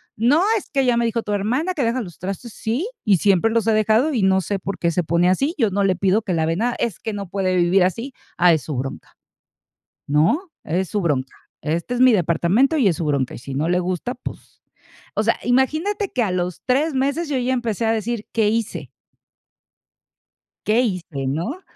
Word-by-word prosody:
"No, 270 - +3
es - - -7
que 270 -3 +1
ya 245 -1 +3
me 235 - +2
dijo 230 0 0
tu 210 - -3
hermana 250 - 0
que 285 -7 -1
dejas 235 +1 0
los 175 -4 -11
trastes". 195 +5 -6
"Sí, 250 - -2 0.2
y 200 -3 +5
siempre 200 +4 +3
los 230 -2 +1
he 220 - +4
dejado 220 +8 +2
y 230 - +1
no 190 0 +3
sé 195 +3 -3
por 195 0 -5
qué 170 -1 +1
se 180 +1 0
pone 170 +2 +2
así, 275 - +1
yo 225 -6 +2
no 200 +1 +1
le 190 -2 +2
pido 195 +3 +2
que 185 - -2
lave 165 0 +1
nada". 240 +3 0
"Es 225 -7 -2
que 220 -2 -4
no 200 -2 -5
puede 185 -2 0
vivir 180 +2 +4
así". 230 +9 -2 0.2
"Ah, 175 -1 +5
es 155 - +1
su 150 - -5
bronca, 135 +1 -6 0.9
¿no?, 170 - +2
es 180 +3 -1
su 210 - 0
bronca. 140 -7 -1 0.3
Este 170 +10 -2
es 245 - -2
mi 255 -1 +7
departamento 190 - +2
y 240 - +3
es 170 - 0
su 170 - -3
bronca, 140 -3 0
y - - -7
si 135 +3 -8
no 155 +4 0
le 180 0 +2
gusta, 185 +7 -3
pues", 250 - -10 0.5
o 215 - +1
sea, 230 - +2
imagínate 310 - +1
que 245 - +1
a 195 - -1
los 180 -1 -2
3 285 +5 +1
meses 285 +5 0
yo 275 - 0
ya 255 +1 0
empecé 230 -3 -1
a 225 - +2
decir: 225 0 -3
"¿Qué 220 -2 +2
hice?" 225 0 -2 1.8
"¿qué 220 +3 +3
hice, 175 - -3
no?". 175 - -3
210 Hz, 220 wpm, -21 LUFS, 180-245 Hz, 1.8 s, mi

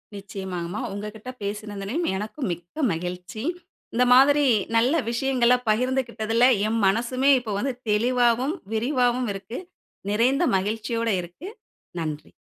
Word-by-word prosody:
நிச்சயமாங்மா, 190 -2 -5
உங்ககிட்ட 210 +4 -7
பேசினதிலயும் 210 - -3
எனக்கு 210 +8 -6
மிக்க 175 - -5
மகிழ்ச்சி. 180 +5 -5 0.5
இந்த 245 - +3
மாதிரி 285 +3 +6 0.3
நல்ல 240 +6 +4 0.2
விஷயங்கள 250 0 +3
பகிர்ந்து 255 +4 +2
கிட்டதுல 230 +1 +1 0.2
என் 225 +1 0
மனசுமே 255 +6 +2
இப்போ 235 -3 -6
வந்து 265 +2 -1 0.2
தெளிவாவும், 245 - +2 0.2
விரிவாவும் 245 +1 +1
இருக்கு. 195 +5 -7 0.5
நிறைந்த 255 +9 +2
மகிழ்ச்சியோட 225 +3 -2
இருக்கு. 180 - -9 0.5
நன்றி. 155 -1 -5
230 Hz, 110 wpm, -24 LUFS, 200-255 Hz, 0.5 s, மாதிரி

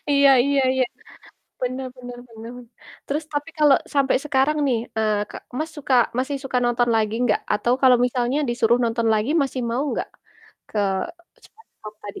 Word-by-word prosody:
Iya 280 -1 +6
iya 280 0 +2
iya. 260 -1 +2 0.8
Bener 255 +1 -2
bener 245 -1 -9
bener. 225 0 -10 0.6
Terus 300 +3 -2
tapi 290 +2 -3
kalo 300 -2 +6 0.2
sampe 275 -2 +3
sekarang 295 +1 +1
nih, 245 -4 +2 0.2
eee 215 -1 +1
Kak - - -9 0.2
Mas 315 +1 -3
suka 275 -3 -1 0.2
masih 265 +2 -1
suka 255 -1 0
nonton 240 0 +1
lagi 215 -1 0
enggak? 245 -3 +2
Atau 235 +4 +1
kalo 260 -1 +7
misalnya 245 +2 -1
disuruh 240 0 +2
nonton 230 0 0
lagi, 215 +5 0
masih 270 -1 -3
mau 245 +4 0 0.2
gak? - - -3 0.6
Ke - - -8 0.7
SpongeBob 215 - -15
tadi? 205 - -8
255 Hz, 160 wpm, -22 LUFS, 230-280 Hz, 0.8 s, kalo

